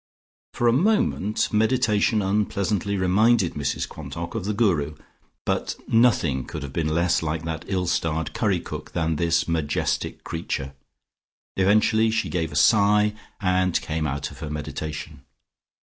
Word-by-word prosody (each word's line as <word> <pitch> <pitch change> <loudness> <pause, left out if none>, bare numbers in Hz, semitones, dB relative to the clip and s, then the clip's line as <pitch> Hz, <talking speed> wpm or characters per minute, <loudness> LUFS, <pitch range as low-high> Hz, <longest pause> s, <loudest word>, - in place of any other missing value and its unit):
For 120 - +1
a 115 - +5
moment 135 - +1
meditation 110 -1 +2
unpleasantly 100 0 0
reminded 100 +1 +3
Mrs 70 -1 -2
Quantock - - -7
of - - -3
the 105 - -1
Guru, 80 -10 +1 0.5
but - - -1
nothing 105 - +3
could - - -6
have 70 -1 -7
been 80 -2 -1
less 85 +2 +1
like 80 0 -2
that 80 0 -4
ill 95 -2 -1
starred 80 -2 -1
curry 100 -5 +1
cook - - -8
than 80 -2 0
this 85 0 +1
majestic 80 -3 -1
creature. 70 -5 -4 0.8
Eventually 110 +3 +3
she 110 - -1
gave 80 -2 -1
a 75 - -9
great - - +1
sigh 105 +2 +4 0.3
and 90 -2 +1
came 80 0 -2
out 70 -1 -3
of - - -13
her 80 -2 -5
meditation. 75 0 -6
90 Hz, 150 wpm, -24 LUFS, 80-105 Hz, 0.8 s, a